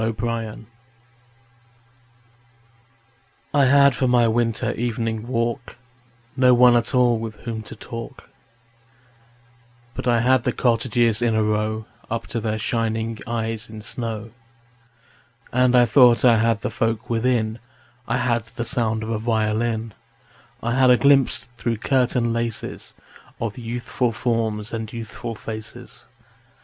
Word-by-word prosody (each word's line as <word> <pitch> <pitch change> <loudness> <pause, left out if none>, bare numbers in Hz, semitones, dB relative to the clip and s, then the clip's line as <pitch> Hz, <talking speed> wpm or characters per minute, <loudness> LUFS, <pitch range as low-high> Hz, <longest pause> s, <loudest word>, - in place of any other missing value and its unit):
Good 110 +1 -2
Hours 115 -2 -3 3.0
I 140 -2 +4
HAD 140 +1 +5
for 130 - 0
my 120 -1 +4
winter 115 0 0
evening 115 -1 -3
walk 120 -1 -2 0.6
No 125 -2 +5
one 125 0 +6
at 120 +1 +1
all 120 -2 +3
with 110 -1 -6
whom 115 -2 -5
to 110 - -10
talk, 120 +4 -9 1.6
But - - -5
I 120 -1 +3
had 130 0 +3
the - - 0
cottages 120 -2 +1
in 115 -2 +2
a 110 - +2
row 110 +1 -1 0.2
Up 115 0 -3
to 115 - 0
their 110 -1 -2
shining 115 0 -2
eyes 115 -1 -3
in 110 -1 -9
snow. 115 -1 -4 1.2
And 125 0 +3
I 120 -1 +6
thought 120 0 +5
I 120 -2 +6
had 115 -1 +1
the - - -3
folk 115 +1 -1
within: 115 -1 0 0.5
I - - 0
had 120 -3 0
the 115 +1 -6
sound 110 -4 0
of 110 - -4
a 110 - -1
violin; 110 0 -1 0.7
I 120 +1 0
had 130 0 +4
a 125 - +6
glimpse 140 -1 +3
through 115 -1 -2
curtain 125 -1 +1
laces 115 -1 -4 0.4
Of 115 +1 -4
youthful 120 +1 -2
forms 110 -2 -2
and 110 -1 -4
youthful 115 0 -6
faces. 110 0 -8
115 Hz, 135 wpm, -22 LUFS, 110-120 Hz, 3.0 s, one